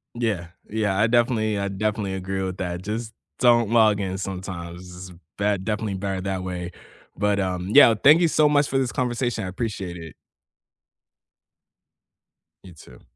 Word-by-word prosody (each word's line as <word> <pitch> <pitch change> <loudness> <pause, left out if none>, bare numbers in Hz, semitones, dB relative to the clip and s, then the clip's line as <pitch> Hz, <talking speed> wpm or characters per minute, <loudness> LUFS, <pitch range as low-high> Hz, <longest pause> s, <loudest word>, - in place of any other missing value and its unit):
Yeah 110 -8 -2 0.2
yeah, 105 -3 -1
I 110 - +4
definitely 115 -3 +1
I 100 0 -1
definitely 100 0 -2
agree 95 +1 -3
with 95 0 -4
that, 90 -1 -4
just 110 +3 -5 0.3
don't 120 -3 +4
log 110 -3 +4
in 95 -1 -3
sometimes, 90 -1 -7
it's 90 -1 -15 0.2
bet 100 -2 0
definitely 105 -1 -2
better 95 -1 -3
that 95 -1 -3
way, 90 -1 -5 0.5
but 105 0 +1
um, 90 -1 -2
yeah, 140 -5 +8
thank 155 +5 +7
you 170 - +4
so 155 -1 +3
much 145 -1 +3
for 135 - -1
this 130 -3 0
conversation, 120 -2 -2
I 95 - -4
appreciate 95 -3 -4
it. 80 -2 -10 2.5
You 90 -2 -12
too. 65 -5 -16
100 Hz, 160 wpm, -23 LUFS, 95-115 Hz, 2.5 s, yeah